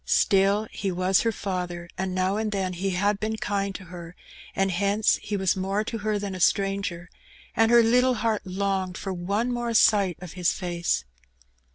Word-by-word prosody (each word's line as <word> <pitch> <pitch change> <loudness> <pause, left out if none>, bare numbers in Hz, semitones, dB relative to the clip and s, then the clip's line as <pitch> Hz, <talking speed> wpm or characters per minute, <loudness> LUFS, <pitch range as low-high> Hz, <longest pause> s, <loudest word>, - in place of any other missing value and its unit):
Still 200 +2 +3
he 195 -2 -3
was 185 +1 +2
her 230 - +1
father^ 180 -4 -4
and 185 0 -3
now 185 +1 +1
and 215 0 -1
then 190 -2 -1
he 190 +3 -2
had 200 +2 0
been 220 +1 -2
kind 200 -2 -2
to 195 - -7
her^ 175 -1 -9 0.4
and 195 0 +1
hence 200 +4 +2
he 205 - -3
was 190 -2 +1
more 195 +2 -1
to 225 +1 -5
her 210 0 -1
than 200 -1 -4
a 185 - -6
stranger^ 195 -2 0 0.5
and 225 0 +4
her 235 0 +6
little 250 +2 +3
heart 220 -1 0
longed 190 -1 -2
for 195 - -4
one 200 +7 -1
more 240 -1 -2
sight 200 -5 +4
of 180 -2 -9
his 180 -2 +1
fiEM^e. 175 - -1
195 Hz, 190 wpm, -25 LUFS, 185-210 Hz, 0.5 s, her